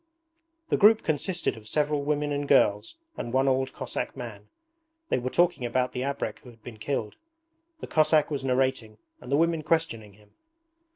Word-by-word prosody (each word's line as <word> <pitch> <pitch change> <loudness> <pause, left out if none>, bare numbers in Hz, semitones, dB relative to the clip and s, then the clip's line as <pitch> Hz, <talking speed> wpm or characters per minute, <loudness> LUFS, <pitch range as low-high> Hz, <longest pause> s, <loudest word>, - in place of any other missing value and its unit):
The - - +2
group 215 +2 +6
consisted 170 +4 -1
of 110 -1 -13
several 150 +3 0
women 145 0 -1
and 145 0 -2
girls 105 - +3 0.2
and 120 - -4
one 135 +2 +2
old 130 0 +1
Cossack 130 0 -5
man. 110 -5 -8 0.6
They - - +1
were 125 +1 -3
talking 175 -2 +2
about 125 +1 0
the 125 - -4
abrek 130 -5 -3
who 125 - -14
had 115 -2 -18
been 120 -3 -9
killed. 110 -3 -3 0.6
The - - -4
Cossack 155 -1 +3
was 140 -2 -2
narrating 130 -4 0 0.2
and 125 - -10
the 140 - +4
women 165 0 +2
questioning 150 -10 -1
him. 105 0 -23
135 Hz, 175 wpm, -27 LUFS, 115-150 Hz, 0.6 s, group